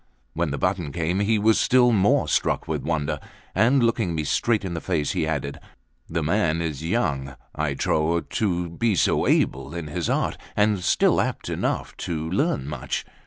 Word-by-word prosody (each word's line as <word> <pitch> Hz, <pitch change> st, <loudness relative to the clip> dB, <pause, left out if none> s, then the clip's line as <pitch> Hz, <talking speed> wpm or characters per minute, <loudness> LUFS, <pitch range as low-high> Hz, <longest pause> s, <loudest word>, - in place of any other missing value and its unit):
When 85 Hz, -1 st, -1 dB
the 70 Hz, -, -3 dB
button 90 Hz, -3 st, -1 dB
came, 85 Hz, +3 st, -1 dB
he 105 Hz, +2 st, +2 dB
was 110 Hz, +1 st, +3 dB
still 125 Hz, -1 st, +4 dB
more 100 Hz, -3 st, +3 dB
struck -, -, 0 dB
with -, -, -2 dB
wonder: 75 Hz, -2 st, -1 dB, 0.3 s
and 125 Hz, +3 st, +4 dB
looking 110 Hz, -7 st, +1 dB
me 80 Hz, -, -1 dB
straight 105 Hz, +7 st, +1 dB
in 90 Hz, -, -3 dB
the 85 Hz, -, -4 dB
face, 75 Hz, -2 st, -1 dB
he 80 Hz, -, -1 dB
added: 70 Hz, -1 st, -3 dB, 0.5 s
"The 80 Hz, -1 st, -1 dB
man 85 Hz, -1 st, +1 dB
is 80 Hz, -3 st, -3 dB
young, 70 Hz, -, -1 dB, 0.2 s
I 75 Hz, -2 st, -1 dB
trow, 80 Hz, +4 st, +1 dB
to 90 Hz, -4 st, -1 dB
be 110 Hz, +4 st, +1 dB
so -, -, +2 dB
able -, -, +1 dB
in 85 Hz, -2 st, -4 dB
his 75 Hz, -, -3 dB
art, -, -, 0 dB, 0.2 s
and 105 Hz, -1 st, +2 dB
still -, -, +3 dB
apt -, -, -3 dB
enough -, -, -2 dB
to 80 Hz, -1 st, -3 dB
learn 95 Hz, -, 0 dB
much." 70 Hz, -4 st, -4 dB
85 Hz, 180 wpm, -24 LUFS, 75-105 Hz, 0.5 s, still